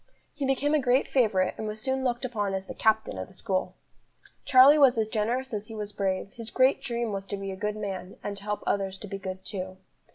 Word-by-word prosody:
He 285 -2 -2
became 275 +2 +1
a 305 - +4
great 255 +1 +3
favourite, 210 -8 +2
and 220 - -3
was 215 0 -5
soon 265 +2 -1
looked 245 0 -1
upon 205 -5 -1
as 190 0 -4
the - - -7
"captain" 220 0 +1
of - - -5
the 185 - -16
school. 190 -1 -2 0.7
Charlie 275 +3 +8
was 265 -4 +6
as 220 -1 +1
generous 240 +4 -1
as 210 0 -3
he 225 - -8
was 210 -1 -5
brave; 195 0 -1
his 230 -1 -6
great 260 +4 +3
dream 235 -2 -2
was 195 -1 -4
to 200 - -4
be 195 0 -5
a - - -5
good 210 +2 -2
man, 195 -3 -5
and 205 - -3
to 200 - -10
help 210 0 -3
others 195 -1 -1
to 205 - -9
be 195 0 -5
good 190 0 -6
too. 185 -1 -5
215 Hz, 245 wpm, -28 LUFS, 195-250 Hz, 0.7 s, Charlie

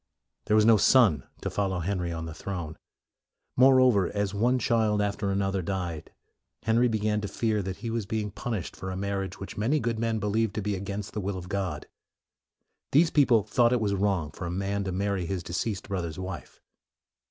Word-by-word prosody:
There 105 - +2
was 105 0 +5
no 115 -1 +7
son 100 - +4 0.2
to - - -2
follow 95 -2 -1
Henry 90 0 -2
on 80 -1 -4
the 80 - -6
throne. 85 -3 -5 0.8
Moreover, 130 -6 +5
as 100 -1 -1
one 120 +5 +2
child 110 -3 +2
after 100 0 -1
an 100 0 +1
other 95 -1 -1
died, 90 -3 -4 0.5
Henry 115 +2 +3
began 105 -2 0
to 100 - -3
fear 105 +1 0
that 95 -1 -5
he 115 - -2
was 115 -3 -2
being 110 -1 -2
punished 105 -3 -4
for 95 - -6
a 95 - -4
marriage 100 0 -3
which 95 - -8
many 130 +9 +2
good 115 -3 -2
men 115 -1 0
believed 105 0 0
to 110 - -1
be 105 0 -1
against 100 +1 -5
the 105 - -3
will 95 0 -3
of 90 0 -8
God. 100 -3 -3 1.1
These 160 +4 +5
people 125 -7 +4
thought 120 +3 +3
it 125 - +2
was 105 -2 0
wrong 95 -6 0
for 90 +3 -6
a - - -4
man 100 +2 -2
to 95 - -2
marry 95 -1 -1
his 95 -1 -3
deceased 95 +4 -3
brother's 85 -6 -3
wife. 95 -3 -7
100 Hz, 200 wpm, -27 LUFS, 95-110 Hz, 1.1 s, no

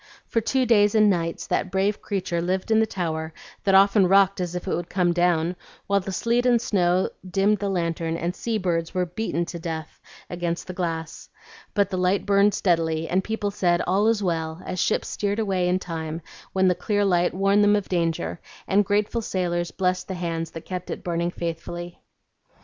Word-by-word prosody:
For 230 - 0
two 260 +3 +1
days 210 -3 +4
and 215 -1 +6
nights 165 -2 -2
that 190 - -1
brave 195 +2 0
creature 185 -4 -2
lived 185 +5 -1
in 220 - +5
the 220 - +3
tower, 160 -4 -3 0.3
that 195 -1 +4
often 195 0 +6
rocked 195 0 +4
as 180 -1 -3
if 180 - -5
it - - 0
would 175 0 -5
come 180 -2 +1
down, 175 0 +2 0.3
while 200 0 +2
the 195 0 -5
sleet 235 +5 +1
and 240 -1 +4
snow 185 -5 +1 0.2
dimmed 200 +2 +2
the 200 - -1
lantern, 165 -2 -1
and 175 +2 -2
sea 230 -2 -2
birds 170 -3 -1
were 180 0 +1
beaten 175 -2 -2
to 170 0 -7
death 160 -2 -6 0.3
against 175 -1 -3
the 185 - -6
glass. 165 -3 -4 0.5
But 200 -2 +2
the 185 - -1
light 185 +2 +1
burned 200 0 +4
steadily, 165 -3 +1
and 190 +2 +1
people 210 -1 -2
said, 175 -3 +1
'All 195 +4 +2
is 225 -2 +2
well,' 165 -1 -2
as 185 -1 -4
ships - - +1
steered 205 0 -2
away 190 -5 0
in 180 - +2
time, 165 -2 -5 0.3
when 190 0 +2
the 180 - +4
clear 205 +2 0
light 175 -2 +2
warned 195 +2 +3
them 205 0 +5
of 205 -2 -1
danger, 165 - -1 0.3
and 200 +2 +4
grateful 210 +3 0
sailors 175 -4 -1
blessed 180 +2 -1
the 190 - -4
hands 165 -2 -3
that 165 0 -9
kept 180 -1 -5
it - - -5
burning 170 0 -1
faithfully." 175 0 -5
180 Hz, 200 wpm, -24 LUFS, 170-200 Hz, 0.5 s, and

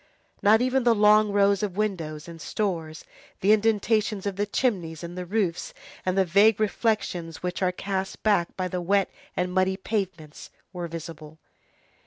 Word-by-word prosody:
Not 220 +3 +5
even 255 0 +1
the 235 -1 +4
long 210 0 +5
rows 200 -1 +3
of 200 -3 -3
windows 165 -8 -3
and 165 -1 -10
stores, 165 -7 -3 0.4
the 200 - +4
indentations 215 -1 +1
of 200 -2 -2
the 205 +2 -1
chimneys, 180 -9 -1
and 170 +1 -7
the 180 -1 -6
roofs, 190 -4 -1 0.3
and 185 +1 +1
the 190 - +4
vague 200 +4 +4
reflections 205 -6 -1
which 180 +1 -3
are 185 -1 +2
cast 190 +1 -4
back 200 -6 +1
by 185 -1 -1
the 180 0 -3
wet 195 +2 +1 0.3
and 180 0 -1
muddy 190 0 +1
pavements, 190 -7 -4 0.2
were 175 -1 -4
visible. 160 -2 -9
190 Hz, 165 wpm, -26 LUFS, 175-210 Hz, 0.4 s, Not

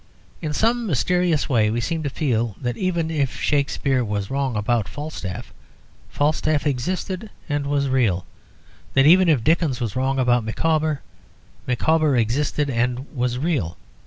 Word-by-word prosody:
In 155 -3 -3
some 230 +8 +1
mysterious 175 - +1
way 115 -7 +3
we 115 +2 -1
seem 160 +7 -2
to 145 - -2
feel 120 -7 -1
that 120 -2 -2
even 170 -2 -1
if 140 -5 -1
Shakespeare 140 -2 +1
was 105 -1 -3
wrong 135 -3 -1
about 105 0 0
Falstaff, 145 -11 -6 0.6
Falstaff 150 0 0
existed 180 - -2 0.2
and 145 -2 -1
was 140 -1 +1
real; 115 -10 +1 0.7
that 135 0 +5
even 180 +3 +6
if 140 -8 +3
Dickens 155 -3 +2
was 115 -5 -3
wrong 135 +1 0
about 125 -2 +3
Micawber, 155 +5 0 0.7
Micawber 150 +2 +2
existed 140 +6 0
and 125 +2 -2
was 125 -1 0
real. 130 - -1
140 Hz, 145 wpm, -22 LUFS, 120-155 Hz, 0.7 s, even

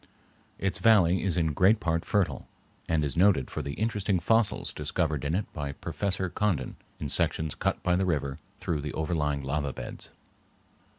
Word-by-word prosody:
Its 95 -1 -1
valley 95 -6 +5
is 95 -3 0
in 80 -3 +1
great 100 +8 +4
part 85 -3 0
fertile, 100 -3 0 0.4
and 80 -2 +2
is 70 - -3
noted 90 -8 +3
for - - -3
the 70 - -4
interesting 105 -1 0
fossils 115 +5 +1
discovered 75 -1 -1
in 75 +3 0
it 100 - 0
by 70 -3 -4
Professor 95 +4 -2
Condon 90 -7 -1 0.2
in 75 - -3
sections 80 +2 +1
cut - - -1
by 90 -1 +3
the 95 - +1
river 70 -5 -1 0.2
through 80 -4 -2
the 75 +1 -5
overlying 75 -3 -1
lava 70 +1 -1
beds. - - -8
85 Hz, 170 wpm, -28 LUFS, 75-95 Hz, 0.4 s, valley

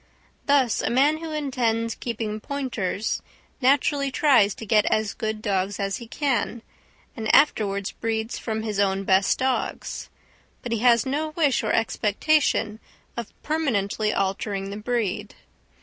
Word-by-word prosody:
Thus, 275 -5 +3
a - - 0
man 285 +5 +3
who 325 -1 -6
intends 240 -6 -1
keeping 220 -3 -4
pointers 225 -7 -2 0.4
naturally 280 +2 +3
tries 260 -8 +4
to 225 - -8
get 210 0 +3
as 215 -2 +1
good 220 -1 -4
dogs 195 -1 -1
as 195 -1 -1
he 235 - -10
can, 250 -3 -1 0.5
and 220 -2 -3
afterwards 200 -9 +2
breeds 225 0 -3
from 220 -1 -3
his 210 -2 -2
own 195 -1 +1
best 190 0 +3
dogs, 260 -1 -2 0.5
but 240 - -5
he 230 - 0
has 235 -1 +4
no 295 +4 -1
wish 295 -6 +2
or - - 0
expectation 220 +1 +1 0.4
of 235 -2 -5
permanently 220 -9 0
altering 195 0 -2
the 205 - -5
breed. 225 -3 -2
225 Hz, 140 wpm, -24 LUFS, 205-265 Hz, 0.5 s, tries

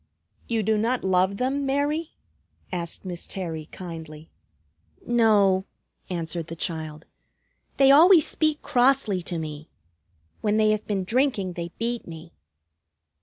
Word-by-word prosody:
"You 225 -2 0
do 215 +1 +1
not 240 +3 0
love 190 +1 +2
them, 270 +4 -1
Mary?" 290 +4 -1 0.6
asked 175 +1 -4
Miss 175 -2 -5
Terry 165 -5 -5
kindly. 160 -4 -9 0.7
"No," 205 -5 +3 0.4
answered 165 -2 -4
the 165 - -7
child. 160 -2 -5 0.7
"They 275 0 +6
always 325 +3 +7
speak 310 -1 0
crossly 245 -6 +2
to 170 0 -4
me. 155 -1 -6 0.7
When 210 0 +1
they 215 -1 +4
have 215 0 -2
been 200 -3 -1
drinking 225 -4 0
they 170 0 -5
beat 235 +1 -3
me." 165 0 -10
195 Hz, 125 wpm, -25 LUFS, 170-245 Hz, 0.7 s, always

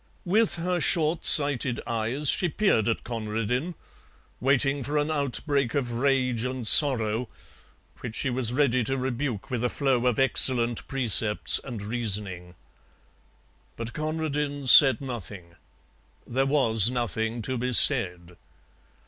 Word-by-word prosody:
With 215 +5 +1
her 180 +1 -3
short 160 +1 0
sighted 140 -4 +3
eyes 115 +6 -3
she 175 - -1
peered 145 - 0
at 115 - -3
Conradin, 115 - -4 0.6
waiting 135 +2 0
for 145 +4 -4
an 150 +1 -1
outbreak 140 -2 -2
of 130 -4 -3
rage 125 -1 -1
and 130 -1 -5
sorrow, 115 -3 +3 0.7
which 115 -3 -8
she 130 - -1
was 120 -2 -1
ready 130 -2 0
to 135 +3 -1
rebuke 130 -4 -5
with 125 -2 -4
a 125 - 0
flow 130 -3 -1
of 125 - -1
excellent 120 -3 +3
precepts 115 -5 +2
and 115 -6 -8
reasoning. 100 -6 -4 1.2
But 115 0 -8
Conradin 150 -2 -4
said 135 +2 +7
nothing: 100 -9 -9 0.7
there 135 +3 -2
was 115 -7 +4
nothing 115 -1 -4
to 130 0 -4
be 125 +1 -3
said. 90 - +2
125 Hz, 130 wpm, -24 LUFS, 115-140 Hz, 1.2 s, said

